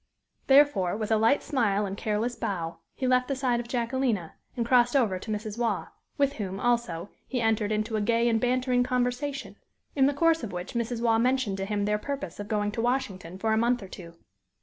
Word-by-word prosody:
Therefore, 270 -10 +4
with 220 0 -3
a - - +5
light 225 +6 +3
smile 210 -7 +1
and 195 0 -4
careless 215 +4 -1
bow, 170 -7 -3 0.2
he 260 - -3
left 250 0 +3
the 275 - -1
side 255 -3 0
of 240 - -5
Jacquelina 235 -6 -1 0.2
and 235 - 0
crossed 245 +1 +4
over 215 -9 +2
to 220 - -9
Mrs. 215 +1 -4
Waugh, 235 -2 -1 0.3
with 280 -1 +2
whom, 195 -3 -4
also, 230 -7 0 0.2
he 255 - -2
entered 220 -2 +1
into 215 +1 -1
a 215 - 0
gay 235 +2 +2
and 225 -2 +2
bantering 250 0 +2
conversation, 250 +3 -2 0.4
in 270 -2 +4
the 285 - +1
course 330 +2 +3
of 225 - -5
which 180 +1 -6
Mrs. 235 0 -2
Waugh 225 -1 +3
mentioned 250 -5 +1
to 195 - -2
him 205 0 -1
their 210 0 +1
purpose 280 +1 -5
of 205 - -5
going 210 -1 0
to 225 - -3
Washington 195 -8 -2
for 220 +3 0
a - - +2
month 240 -1 +1
or - - -8
two. 170 -2 -11
230 Hz, 215 wpm, -27 LUFS, 205-250 Hz, 0.4 s, a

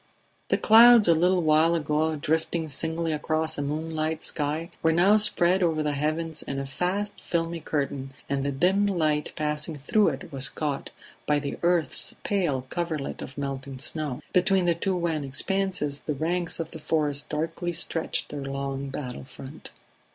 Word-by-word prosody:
The - - +2
clouds 230 -1 +7
a 170 - +7
little 180 +2 +2
while 160 +2 +4
ago 155 0 0
drifting 160 +2 -1
singly 160 +3 -2
across 155 +1 -1
a - - -3
moonlit 155 +2 -2
sky 155 +2 -1
were 160 - +3
now 185 +6 +5
spread 190 -3 +3
over 160 -3 +1
the 150 - 0
heavens 155 +2 -2
in 140 - -5
a 135 - -3
vast 185 +9 -2
filmy 170 0 -2
curtain, 140 -3 -3
and 140 -1 -1
the 140 - -1
dim 185 +8 +2
light 155 -6 0
passing 150 +1 -2
through 200 +10 +2
it 140 +1 -3
was 135 -1 +3
caught 145 -3 -3 0.4
by 150 - +3
the 140 -1 -4
earth's 170 -5 +1
pale 160 -11 0
coverlet 165 -5 -3
of 135 - -9
melting 135 -1 -4
snow; 145 -1 -2
between 185 0 +3
the 170 - +3
two 185 +3 -1
wan 165 -4 -1
expanses 150 0 -1
the 150 - -3
ranks 170 +4 -1
of 165 0 -4
the 160 - -8
forest 150 -2 0
darkly 165 +3 -2
stretched 165 -1 -2
their 145 - -5
long 135 0 -4
battle 130 -2 -6
front. 135 +3 -11
155 Hz, 165 wpm, -26 LUFS, 145-170 Hz, 0.4 s, clouds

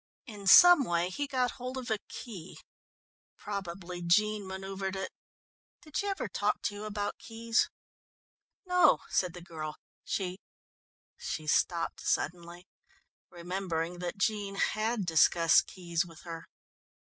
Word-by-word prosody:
In 205 -6 -9
some 355 - +9
way 175 -4 0
he 285 +9 -3
got 255 -3 0
hold 255 +1 -4
of 250 -3 -5
a 215 - +1
key 190 -8 -8 0.8
probably 180 -3 -6
Jean 210 +4 +2
manoeuvred 190 0 -4
it. 190 -1 -4 0.7
Did 305 -2 -15
she 405 - 0
ever 395 -1 -2
talk - - -1
to 210 - -1
you 205 +1 -7
about 205 -1 -3
keys?" 230 0 0 1.0
"No," 360 0 +4
said 180 -2 +1
the 175 - -9
girl, 155 -3 -6 0.3
"she 185 -1 -3 0.4
" - - -78
She 155 - -4
stopped 165 +2 +1
suddenly, 175 0 -2 0.6
remembering 175 -1 -3
that 175 +1 -4
Jean 200 -1 -1
had 215 +1 0
discussed 165 0 +5
keys 170 -2 -2
with 165 -2 -13
her. 165 -1 -8
190 Hz, 135 wpm, -30 LUFS, 175-215 Hz, 1.0 s, some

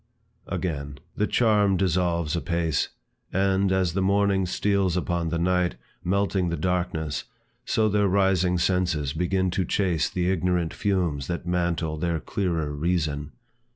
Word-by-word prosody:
Again; 70 -5 -3 0.2
The 105 - +1
charm 105 -5 +3
dissolves 85 -3 +1
apace, 85 -3 0 0.4
And, 95 0 +2
as 95 -3 +1
the 95 - 0
morning 100 -1 +2
steals 95 -1 +1
upon 85 -2 -1
the 85 - -1
night, 90 -4 +1 0.3
Melting 95 -1 +1
the 85 - -2
darkness, 80 -3 -1 0.4
so 110 -1 +2
their 105 -1 +2
rising 95 -2 +2
senses 85 -6 0
Begin 90 +2 0
to 95 +1 0
chase 90 -2 0
the 90 0 0
ignorant 90 -2 0
fumes 85 -9 -1
that 85 0 -3
mantle 85 -3 -1
Their 85 0 -1
clearer 85 -5 -2
reason. 75 -2 -1
90 Hz, 135 wpm, -25 LUFS, 85-95 Hz, 0.4 s, charm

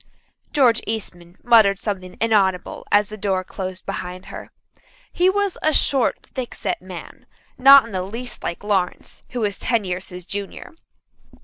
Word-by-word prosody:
George 245 -5 +4
Eastman 180 -5 -5
muttered 220 -5 +5
something 190 -3 -5
inaudible 200 -4 +1
as 205 0 +4
the 215 - -8
door 195 -2 0
closed 185 -1 -6
behind 180 +1 -5
her. - - -8 0.6
He 360 +1 +3
was 400 -1 0
a 310 - +2
short, 270 -3 +1
thickset 240 -7 -4
man, 180 -2 -10 0.3
not 275 0 +8
in 230 - -10
the 185 -2 -2
least 230 +7 -6
like 170 +3 -4
Lawrence, 195 -4 -2
who 245 - -4
was 205 -2 -1
ten 235 -4 +1
years 180 0 -4
his 180 -1 -9
junior. 200 - -6
205 Hz, 150 wpm, -22 LUFS, 185-235 Hz, 0.6 s, not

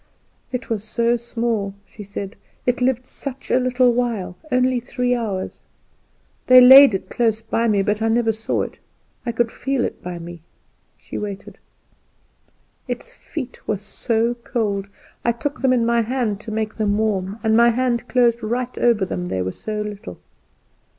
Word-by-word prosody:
"It 250 -2 -4
was 220 -3 -2
so 235 +2 +1
small," 230 -4 -2
she 210 - -11
said; 200 +1 -6 0.3
"it 250 +1 +1
lived 255 0 +1
such 270 0 -7
a 255 - +4
little 250 -1 +3
while 230 -7 -1 0.2
only 255 0 +2
three 250 0 -1
hours. 210 -6 -3 0.9
They 255 0 +9
laid 265 -2 +10
it 190 - -4
close 225 -2 +1
by 230 +1 0
me, 205 -3 +2
but 210 +2 0
I 225 - +2
never 225 0 +2
saw 220 +1 -1
it; - - -8 0.5
I - - +1
could 230 0 0
feel 270 -2 -1
it - - -6
by 180 -1 -6
me." 170 0 -9 0.6
She - - -7
waited; 200 -2 -7 1.3
"its - - -5
feet 265 -6 -8
were 215 - 0
so 225 +3 -1
cold; 220 -5 -2 0.4
I 235 - +3
took 285 +6 -4
them 260 -1 +3
in 240 -2 +3
my 235 0 +3
hand 230 -3 -1
to 220 - -7
make 215 0 -3
them 210 -2 +1
warm, 205 -2 -1
and 220 0 +3
my 235 +1 +6
hand 240 0 0
closed 240 -2 +3
right 240 +3 -2
over 230 -5 +3
them 180 -1 -4
they 95 - -1
were 95 - -2
so 215 - -4
little." 210 +1 -8
230 Hz, 170 wpm, -21 LUFS, 210-245 Hz, 1.3 s, laid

